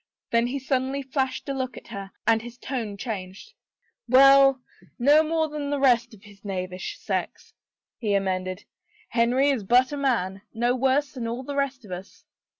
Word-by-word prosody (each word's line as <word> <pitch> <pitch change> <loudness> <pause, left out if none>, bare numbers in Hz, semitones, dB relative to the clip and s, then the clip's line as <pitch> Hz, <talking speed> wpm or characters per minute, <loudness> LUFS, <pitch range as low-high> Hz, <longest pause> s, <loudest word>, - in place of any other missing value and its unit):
Then 235 +1 +3
he 265 +3 -3
suddenly 270 +1 -1
flashed 265 0 -2
a 275 - -1
look 260 -1 -4
at - - -12
her 195 -1 -7 0.2
and 225 0 +3
his 240 +1 -10
tone 235 -6 -4
changed. 200 - -6 0.6
Well, 270 0 +7 0.3
no 290 +5 +5
more 320 0 0
than 295 -1 -4
the 290 - 0
rest 240 -4 +3
of 200 - -21
his 205 -2 -17
knavish 185 - -5
sex/' - - -4 0.5
he 210 -3 0
amended. 185 -1 -2 0.2
" 430 0 -32
Henry 255 +4 +3
is 250 -7 -1
but 250 +6 +4
a 290 - -3
man 215 -9 0
— - - -47
no 240 +2 +1
worse 270 +3 +1
than 245 -4 -5
all 240 +3 -4
the 285 +2 -5
rest 275 -3 -2
of 195 - -12
us." 180 +2 -9
250 Hz, 185 wpm, -25 LUFS, 205-275 Hz, 0.6 s, Well